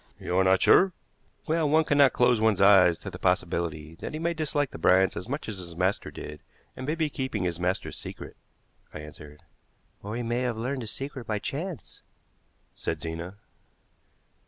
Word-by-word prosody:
"You 90 - -3
are - - +5
not 95 0 +4
sure?" 190 -1 +6 0.5
"Well, 160 -2 +1
one 160 +2 +4
cannot 145 -3 +5
close 125 -2 +3
one's 110 -3 +3
eyes 95 -4 +6
to - - -6
the - - -9
possibility 80 -2 -1
that - - -5
he - - -4
may 170 +1 0
dislike 150 -3 -1
the - - -9
Bryants 95 +3 +4
as 90 +7 -6
much 140 +3 -3
as 105 -4 -5
his 85 -2 -7
master 95 +3 0
did, 75 0 -9 0.3
and 130 - -6
may 155 - 0
be 160 -2 +1
keeping 130 -8 -3
his 85 -2 -2
master's 90 +1 -2
secret," - - -9 0.6
I - - -5
answered. 75 0 -12 0.6
"Or 105 +2 -5
he 120 - -2
may 120 +1 -1
have 125 -3 -1
learned 130 +4 -2
the 115 - -6
secret 135 +1 -6
by 110 - 0
chance," 155 - -6 0.7
said 80 - -4
Zena. 85 +3 -6
110 Hz, 185 wpm, -27 LUFS, 90-140 Hz, 0.7 s, sure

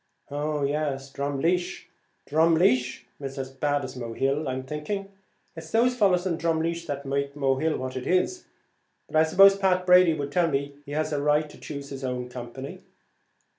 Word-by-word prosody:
"Oh, 150 0 -1
yes, 140 -1 -2
Drumleesh; 165 +7 -1 0.4
Drumleesh 160 -6 +3 0.2
is 135 -1 -6
as 135 -1 -4
bad 145 +1 0
as 130 0 -8
Mohill; 135 +4 -1
I'm 130 0 -3
thinking 195 +8 -4 0.4
it's 160 -1 -9
those 245 +5 +3
fellows 190 -6 +3
in 170 -3 -1
Drumleesh 165 +1 -1
that 140 0 -4
make 140 +1 -2
Mohill 140 +2 +1
what 130 0 -5
it 130 0 -4
is; 185 - +1 0.6
but - - -9
I 155 - +6
suppose 195 +5 +7
Pat 185 -2 +1
Brady 180 -2 +6
would 140 -2 -4
tell 175 +2 +3
me 140 0 -2
he 145 - -6
has 155 0 -1
a 145 - 0
right 150 +1 +2
to - - -15
choose 140 -1 -7
his 135 -1 -7
own 125 -1 -3
company." 125 +2 -8
150 Hz, 170 wpm, -26 LUFS, 135-170 Hz, 0.6 s, suppose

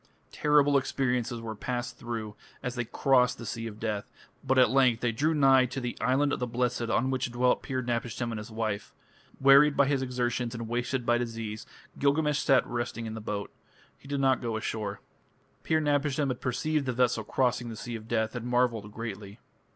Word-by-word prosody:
Terrible 145 -1 +4
experiences 125 -3 -1
were 115 -1 -5
passed 120 +3 -4
through 115 -3 -5 0.3
as 125 - -2
they 120 -1 -2
crossed 125 +1 +2
the 115 - -8
Sea 115 +1 -4
of 105 -1 -9
Death, 105 -2 -3 0.3
but 130 0 +1
at 125 -3 +6
length 125 -4 +3
they 120 - +1
drew 150 +8 +1
nigh 135 -3 +5
to 130 +2 -5
the 125 -2 -4
"Island 135 +4 +2
of - - -2
the 125 - -1
Blessed" 120 -1 -1
on 130 +3 +1
which 130 -1 -1
dwelt 125 +1 +2
Pir 130 -2 -3
napishtim 120 0 -2
and 110 - -4
his 105 +2 -8
wife. 110 -2 -3 0.4
Wearied 140 +2 +6
by 140 - +5
his 135 -1 +1
exertions 125 -2 -2
and 115 -1 -5
wasted 120 +2 -2
by 120 0 +3
disease, 115 -3 -5 0.3
Gilgamesh 150 +1 +2
sat 135 -4 +3
resting 120 -1 -4
in 110 - -5
the 110 - -6
boat. 105 -1 -4 0.4
He - - -17
did 140 0 -2
not 135 -1 +3
go 115 -3 -2
ashore. 105 -2 -4 0.6
Pir 160 - +2
napishtim 145 -1 +1
had 125 - -4
perceived 140 +3 -1
the 125 - 0
vessel 120 -2 +1
crossing 125 +1 0
the 115 - -6
Sea 120 +2 -6
of 110 -1 -8
Death 110 0 -1
and 120 0 -4
marvelled 120 -4 +1
greatly. 105 -3 -7
120 Hz, 195 wpm, -28 LUFS, 115-135 Hz, 0.6 s, at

